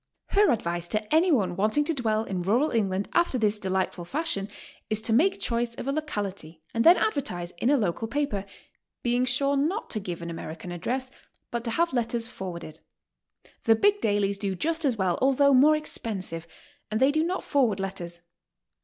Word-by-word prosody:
Her 410 0 +4
advice 175 -6 -1
to 215 +7 -2
anyone 275 - +3
wanting 215 +10 +2
to 325 - 0
dwell 220 -5 0
in 190 -4 -3
rural 235 - +2
England 200 -3 0
after 340 -6 +2
this 215 -2 +2
delighful 190 -2 -1
fashion 260 - -2 0.4
is 215 - +1
to 225 - 0
make 345 - +3
choice 235 0 -1
of 245 - -6
a - - +1
locality 200 - -4
and 230 - +1
then 345 +2 +8
advertise 180 - -1
in 240 - +2
a 290 - +5
local 210 0 -1
paper, 270 -7 -2 0.6
being 245 +1 +2
sure 275 +3 +1
not 320 +11 -1
to 215 - -1
give 175 -4 -6
an 170 - -5
American 165 +1 -7
address, 255 +9 -3 0.4
but 235 -1 -2
to - - -1
have 335 +7 +1
letters 235 -1 0
forwarded. 180 -8 -7 0.9
The 225 - +6
big 410 - +3
dailies 200 -1 +1
do 195 -2 -1
just 325 - -1
as 250 -5 +1
well, 185 -3 0
although 275 +1 +4
more 290 +4 +6
expensive, 190 - -4 0.4
and 215 - -1
they 265 +2 +5
do 310 +2 +1
not 360 +3 -2
forward 240 -8 +1
letters. 175 -3 -5
225 Hz, 180 wpm, -27 LUFS, 190-280 Hz, 0.9 s, then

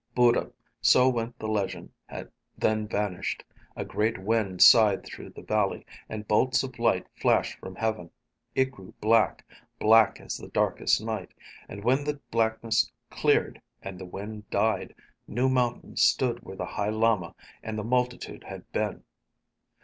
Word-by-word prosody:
Buddha, 120 -1 +3 0.3
so 125 0 +6
went 120 -1 -3
the 110 - -5
legend, 105 -3 -2 0.7
then 110 -1 +1
vanished. 105 -4 -2 0.3
A - - -4
great 110 +2 0
wind 100 -2 +2
sighed 110 -4 +7
through - - -9
the - - -12
valley, 105 -2 0 0.2
and 110 -1 -6
bolts 125 +5 +3
of 130 -2 -7
light 105 -6 +2
flashed - - +1
from 95 - -9
heaven. 110 -5 -2 0.5
It 130 0 +2
grew 95 -7 -14
black, 110 0 +2 0.3
black 110 0 +5
as - - -5
the - - -9
darkest - - +1
night. 110 -4 -5 0.3
And 100 +1 -8
when 130 +5 +2
the 145 0 -3
blackness 115 0 +1 0.2
cleared - - +1 0.2
and 95 -1 -7
the 95 - -7
wind 105 +3 -8
died, 110 +2 0 0.3
new 125 +4 +1
mountains 125 -2 0
stood 120 -2 +3
where 95 - -10
the - - -3
High 105 0 -2
Lama 110 -5 +1 0.3
and 110 0 -5
the 105 - -3
multitude 125 +2 -2
had - - -10
been. - - -2
110 Hz, 150 wpm, -27 LUFS, 105-120 Hz, 0.7 s, sighed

